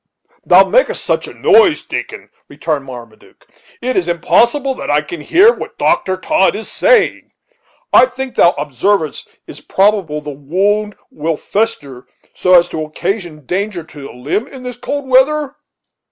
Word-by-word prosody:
"Thou - - +5
makest - - +1
such - - -1
a - - -10
noise, 415 -7 +4
Dickon," - - -6 0.2
returned 150 -4 -3
Marmaduke, 120 -4 -13 0.4
"it 255 +1 -1
is 175 - 0
impossible 240 - +1
that - - -7
I 145 +1 +2
can 150 +1 -8
hear 390 - +4
what - - -9
Dr. 185 0 0
Todd 190 +1 +1
is 220 - -6
saying. 480 -5 +2 0.6
I 255 - +7
think 260 0 -6
thou 170 - +4
observedst, 150 - -1
it - - -32
is - - -12
probable 195 -6 +1
the 150 0 -7
wound 195 +9 -1 0.2
will 155 +1 -3
fester, 145 - -3 0.3
so 185 0 +3
as 175 -1 +5
to 155 - -4
occasion 165 -1 -5
danger 190 0 -3
to 150 -2 -13
the 135 - -9
limb 145 - -3
in 265 -3 -12
this 250 -1 -6
cold 285 +2 -5
weather?" 280 +2 +2
190 Hz, 160 wpm, -15 LUFS, 150-255 Hz, 0.6 s, I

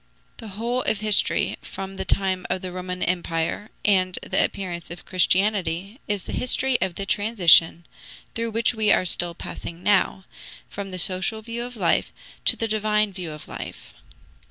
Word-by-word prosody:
The 225 - -9
whole 240 +3 -1
of 215 -4 0
history 215 -2 +2
from 195 0 -7
the - - -4
time 190 -1 +1
of 185 - -2
the 185 - -5
Roman 180 0 -4
Empire 175 +3 -2 0.2
and 185 -3 +3
the - - +1
appearance 175 -3 -4
of 170 0 -9
Christianity 190 - +1
is 205 -3 -1
the - - -7
history 255 0 +3
of 185 -2 -1
the 195 - -4
transition, 180 -6 +4 0.5
through 230 0 -2
which 230 +2 +1
we 215 -2 +2
are 185 - +3
still 175 -1 -1
passing 170 +1 -8
now, 190 -2 +2 0.4
from 200 -1 -7
the 185 - -6
social 190 +5 0
view 235 +1 -5
of 245 0 -8
life 215 - +1 0.3
to - - +6
the 225 - -2
divine 215 -1 +1
view 180 -4 -6
of 150 0 -10
life. - - -8
195 Hz, 170 wpm, -24 LUFS, 180-215 Hz, 0.5 s, to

